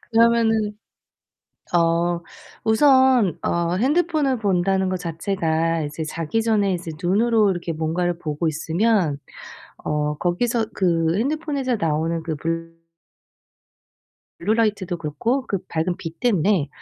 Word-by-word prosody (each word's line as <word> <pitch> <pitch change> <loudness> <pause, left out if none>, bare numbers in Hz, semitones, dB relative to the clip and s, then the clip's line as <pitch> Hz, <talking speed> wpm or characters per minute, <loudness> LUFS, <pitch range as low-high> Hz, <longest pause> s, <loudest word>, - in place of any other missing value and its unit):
그러면은 225 -2 +3 1.0
어 170 0 +2 0.4
우선 260 - +4
어 170 0 0
핸드폰을 290 - +1
본다는 190 -1 +1
것 185 - -1
자체가 165 -2 -1
이제 150 +2 -4
자기 165 +7 -2
전에 210 -4 +2
이제 170 -1 -4
눈으로 215 +3 +3
이렇게 170 -2 -3
뭔가를 170 +2 -1
보고 155 0 -2
있으면 160 +1 +1 0.7
어 150 0 -1
거기서 225 +6 0
그 165 -3 +1
핸드폰에서 280 -2 -1
나오는 165 +1 -1
그 160 -1 -3
블 165 +1 -5 1.5
블루라이트도 205 -2 0
그렇고 195 - -1
그 195 - -1
밝은 170 +2 -1
빛 165 -2 -8
때문에 195 - +2
180 Hz, 255 characters per minute, -22 LUFS, 165-225 Hz, 1.5 s, 우선